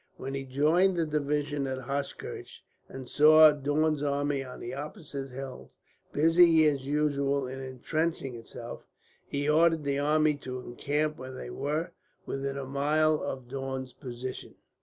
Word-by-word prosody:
When 135 - -5
he 135 0 -3
joined 160 +8 +3
the 165 - +2
division 145 -1 -1
at 130 0 -2
Hochkirch, 140 +2 -5 0.3
and 130 -1 -8
saw 155 +1 +8
Daun's 150 +1 0
army 145 -1 0
on 130 -1 -9
the 120 - -6
opposite 140 -1 -6
hills, 130 0 -8 0.3
busy 165 +1 +5
as 140 -3 +1
usual 140 -2 +1
in 130 +1 -6
intrenching 135 +2 -2
itself, 115 -1 -9 0.4
he 145 0 -2
ordered 160 +1 +4
the 140 0 0
army 150 +1 +3
to 130 -2 -6
encamp 145 +5 -2
when 130 0 -7
they - - -7
were 150 - -2 0.3
within 135 0 -3
a 140 - -4
mile 150 +3 +2
of 130 -2 -5
Daun's 130 0 -5
position. 130 -2 -7
140 Hz, 145 wpm, -29 LUFS, 135-155 Hz, 0.4 s, saw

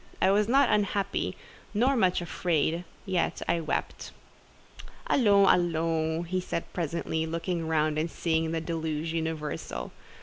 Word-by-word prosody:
I 190 - +4
was 205 +1 +3
not 270 +3 +5
unhappy, 200 -1 0 0.4
nor 255 +6 +3
much 185 -7 +2
afraid, 170 0 0 0.2
yet 185 -3 -1
I 170 - +2
wept. 160 -2 -3 1.0
"Allons, 200 -6 +4
allons!" 165 -1 0 0.2
said 170 - -2
he - - -24
presently, 160 -1 -2
looking 165 0 -2
round 155 -1 +1
and 160 +2 -1
seeing 160 -1 0
the 165 -1 -1
deluge 160 -1 -3
universal. 160 -2 -3
165 Hz, 130 wpm, -28 LUFS, 160-185 Hz, 1.0 s, not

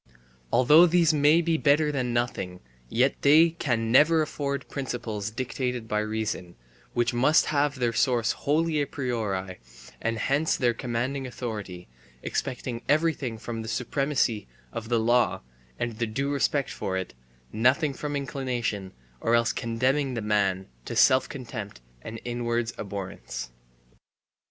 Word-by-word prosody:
Although 150 +8 +7
these 165 -1 +4
may 150 +3 +5
be 165 -1 +1
better 150 +1 +3
than 130 -4 -1
nothing, 120 -7 -2 0.3
yet 130 - +1
they 160 +4 +6
can 120 -8 -1
never 155 +5 +5
afford 140 -2 -3
principles 115 -6 -4
dictated 125 0 -3
by 105 -1 0
reason, 110 -5 -3 0.4
which 120 0 +1
must 130 +6 +4
have 145 0 +2
their 120 -3 0
source 120 -3 +2
wholly 155 +1 0
a 140 - -1
priori 105 -9 -3 0.4
and 115 0 -1
thence 145 +4 +2
their 120 -3 +2
commanding 125 +3 -2
authority, 105 -8 -6 0.4
expecting 125 -3 -3
everything 145 -6 +1
from 115 +1 -5
the 110 - -7
supremacy 125 - 0 0.3
of 110 0 -5
the 120 -1 +2
law 120 +1 +2 0.4
and 120 -2 -3
the 115 - 0
due 135 +6 -2
respect 140 -1 0
for 95 -1 -3
it, 95 - -4 0.4
nothing 130 +6 +2
from 145 +2 -4
inclination, 125 -8 -3 0.3
or 115 - +2
else 115 0 +2
condemning 130 +4 0
the 115 - -2
man 100 -3 +1 0.2
to - - -5
self 130 0 +5
contempt 115 - -7 0.2
and 110 - -7
inward 120 -1 -1
abhorrence. 95 - -6
120 Hz, 140 wpm, -27 LUFS, 110-140 Hz, 0.4 s, Although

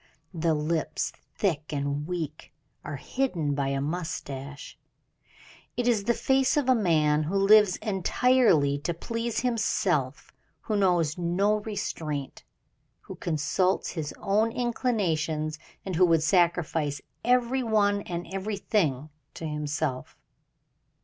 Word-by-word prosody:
The 165 -1 +1
lips, 155 0 -1 0.2
thick 160 -7 -1
and 145 0 -2
weak, 160 -4 -5 0.3
are - - -5
hidden 175 - -1
by 140 -1 -1
a 135 0 -1
mustache. 140 -3 -5 1.0
It 245 -1 0
is 220 -5 +2
the 235 +1 +2
face 265 +1 +2
of 285 -3 +1
a 260 - +6
man 155 -9 +2
who 180 +6 -2
lives 195 -1 +6
entirely 195 - +3
to 170 +3 -3
please 230 +5 -3
himself 190 - 0 0.3
who 215 - -2
knows 175 -5 +2
no 190 +5 +2
restraint 155 -9 -4 0.6
who - - -9
consults 170 +4 0
his 155 -4 -4
own 215 +3 +1
inclinations, 165 - -1 0.3
and 190 -2 -3
who 180 +2 +5
would 165 -2 +3
sacrifice 165 -4 +1 0.2
every 250 +2 +2
one 205 -3 +2
and 175 -2 -5
everything 190 - -1 0.2
to 165 - -6
himself. 150 -3 -3
175 Hz, 120 wpm, -27 LUFS, 150-210 Hz, 1.0 s, a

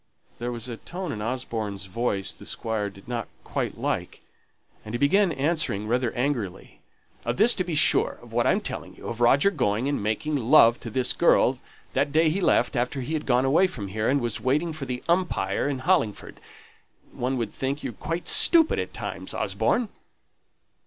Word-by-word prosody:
There 120 +1 -3
was 120 0 -6
a 120 -2 -6
tone 180 +3 -6
in 105 - -5
Osborne's 110 -4 -4
voice 100 0 -2
the - - -11
Squire 110 -2 -2
did 100 0 -17
not 120 -2 -3 0.2
quite - - -3
like; - - -3 0.6
and 110 +2 -6
he - - +1
began 180 +8 +3
answering 145 -8 -1
rather 120 0 0
angrily. 120 -7 -3 0.4
"Of - - -2
this, 220 +5 +8
to 185 - 0
be 175 -3 -3
sure - - +3
of - - -15
what - - +2
I'm - - +2
telling - - -6
you - - -13
of 115 0 -5
Roger 140 +10 +4
going 120 - 0
and 145 -5 -1
making 110 +9 -1
love 120 -2 +5
to 115 - -7
this 125 +3 0
girl, - - +3 0.3
that 140 +2 +1
day 160 +2 +4
he 195 +5 -1
left, 175 - +2
after 125 +3 -1
he 145 +6 -4
had 155 -1 -3
gone 125 0 +3
away 160 +8 +4
from 105 - -7
here, 110 +3 -1
and 140 +2 +2
was 120 -3 -3
waiting 150 +6 0
for 150 -3 -6
the 125 -1 -5
'Umpire' 170 - 0
in 140 - -2
Hollingford. 130 - -1 0.7
One 130 +2 -2
would 115 -4 -3
think 135 +2 -3
you - - -4
quite 165 +2 -5
stupid 325 -2 +5
at - - -5
times, - - -5
Osborne." 240 -4 0
130 Hz, 190 wpm, -25 LUFS, 115-155 Hz, 0.7 s, this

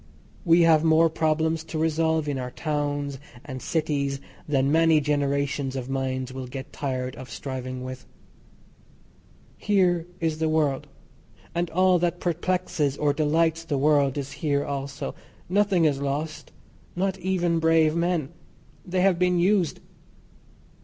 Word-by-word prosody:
We 170 0 +5
have 160 -2 +5
more 160 0 +4
problems 160 0 0
to 160 - -5
resolve 160 0 +1
in 140 -2 -1
our 125 -1 -4
towns 145 -1 -2 0.3
and 130 -3 -6
cities 145 -4 -1 0.3
than 135 -1 +2
many 160 0 +5
generations 140 -2 -1
of 130 0 -4
minds 130 -1 -2
will 130 -1 -6
get 135 +2 -8
tired 130 -2 -3
of 130 -1 -9
striving 130 +2 -5
with. 130 0 -8 1.5
Here 180 -4 +2
is 160 -2 -1
the 160 -1 +1
world, 150 -4 +1 0.7
and 170 0 -1
all 185 +1 +3
that 175 0 0
perplexes 175 -5 -1
or 145 -1 +2
delights 160 +2 +1
the 155 -4 -2
world 140 -1 +3
is 140 -1 -4
here 145 -1 -1
also. 140 +1 -4 0.3
Nothing 190 -2 +2
is 140 -3 +1
lost. 145 +3 -3 0.4
Not 190 +1 -1
even 175 -2 0
brave 160 -1 +3
men. 170 -4 0 0.5
They 180 0 -1
have 185 -2 +3
been 180 0 +3
used. 180 -1 +2
155 Hz, 140 wpm, -25 LUFS, 140-165 Hz, 1.5 s, We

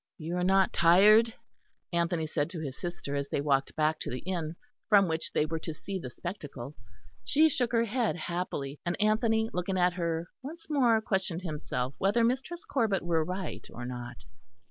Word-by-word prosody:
"You 165 +1 -4
are 180 - 0
not 190 +1 +3
tired?" 210 +7 +6 0.6
Anthony 170 -1 +1
said 150 -1 -1
to 170 - -6
his 140 -4 -5
sister, 175 -4 -5
as 140 0 -2
they - - 0
walked 140 -1 +1
back 155 0 +1
to - - -4
the 125 - -3
inn 170 -4 -2 0.3
from 200 -3 +6
which 160 0 -2
they 150 - +2
were 160 +1 -3
to 160 0 -5
see 195 +4 -5
the 130 - -6
spectacle. 145 - -7 0.5
She 310 +2 +4
shook 250 -4 0
her 230 -1 +3
head 230 -1 0
happily; 165 -5 -4
and 175 0 -2
Anthony, 220 +1 +2
looking 180 +1 -1
at 180 0 +3
her, 170 -1 -2
once 320 +5 -9
more 240 -6 +4
questioned 190 -4 -1
himself 140 -6 -3
whether 205 +5 +3
Mistress 265 +9 -1
Corbet 225 -8 +1
were 165 -2 +1
right 185 +3 -4
or 120 - -7
not. 125 -1 -6
175 Hz, 185 wpm, -30 LUFS, 155-215 Hz, 0.6 s, tired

